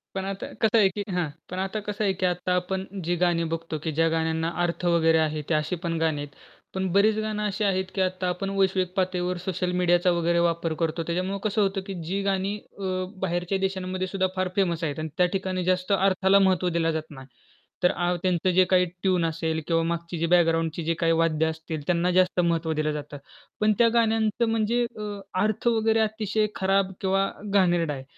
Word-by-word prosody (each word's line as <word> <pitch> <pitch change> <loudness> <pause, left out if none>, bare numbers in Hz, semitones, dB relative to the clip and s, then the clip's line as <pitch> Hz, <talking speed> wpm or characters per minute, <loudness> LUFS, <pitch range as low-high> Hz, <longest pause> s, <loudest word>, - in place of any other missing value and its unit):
पण 190 0 -2
आता 195 0 -4
कसं 225 0 +4
आहे 200 -3 +5
की 205 +2 -4
हां. 175 -4 0 0.2
पण 180 +1 -4
आता 195 +3 -2
कसं 210 +1 -2
आहे 195 -2 +2
की 185 - +1
आता 180 0 0
आपण 190 +1 -2 0.2
जी 175 +1 +1
गाणी 170 -1 +2
बघतो 165 -1 -4
की 160 - -1
ज्या 165 0 +4
गाण्यांना 160 0 0
अर्थ 175 +1 -2
वगैरे 165 -2 +4
आहे 155 0 -4
ते - - +2
अशी 155 +4 0
पण 165 -1 -1
गाणी 160 -3 0
आहेत. 145 - -5 0.5
पण 190 0 -1
बरीच 210 +3 +4
गाणं 210 -1 -2
अशी 210 +1 -2
आहेत 190 -2 +1
की 195 - +1
आता 185 0 -1
आपण 185 +2 -3
वैश्विक 190 -2 +1
पातळीवर 180 -1 0
सोशल 180 -1 -1
मीडियाचा 175 0 +3
वगैरे 170 0 +1
वापर 170 -1 0
करतो. 165 0 0
त्याच्यामुळे 185 +3 -2
कसं 215 0 +1
होतं 195 0 0
की 195 - -4
जी 195 +3 -1
गाणी 195 +1 0 0.2
अ, 200 - -7 0.4
बाहेरच्या 175 +2 -1
देशांमध्ये 185 -1 -2
सुद्धा 190 0 0
फार 185 0 0
फेमस 175 -4 0
आहेत 150 -2 -2
आणि 155 0 -3
त्या 180 - +5
ठिकाणी 185 -1 -2
जास्त 185 +2 0
अर्थाला 195 0 +4
महत्त्व 185 -1 +1
दिलं 165 -1 +2
जात 155 0 -7
नाही. 130 -2 -11 0.6
तर 180 - +5
आ 175 -1 0
त्यांचं 185 -1 +1
जे 185 - +8
काही 180 -1 +4 0.2
ट्यून 185 -3 +2
असेल 160 0 -1
किंवा 165 -1 +2
मागची 170 +1 -3
जी 165 - 0
बॅकग्राऊंडची 165 -1 +2
जी 165 +1 +1
काही 165 -1 +2
वाद्य 165 -1 +2
असतील, 160 -1 -4
त्यांना 180 0 +2
जास्त 185 0 +2
महत्त्व 170 -2 +1
दिलं 155 0 0
जातं. 150 -1 -6 0.4
पण 215 0 +3
त्या 235 - +6
गाण्यांचं 225 0 +2
म्हणजे 225 +2 +1 0.2
अ, - - -5 0.4
अर्थ 215 +3 0
वगैरे 225 -1 +3
अतिशय 215 -1 0
खराब 195 0 +1
किंवा 195 0 +1 0.2
घाणेरडा 175 -5 +2
आहे. 135 -2 -7
180 Hz, 205 wpm, -25 LUFS, 165-195 Hz, 0.6 s, जे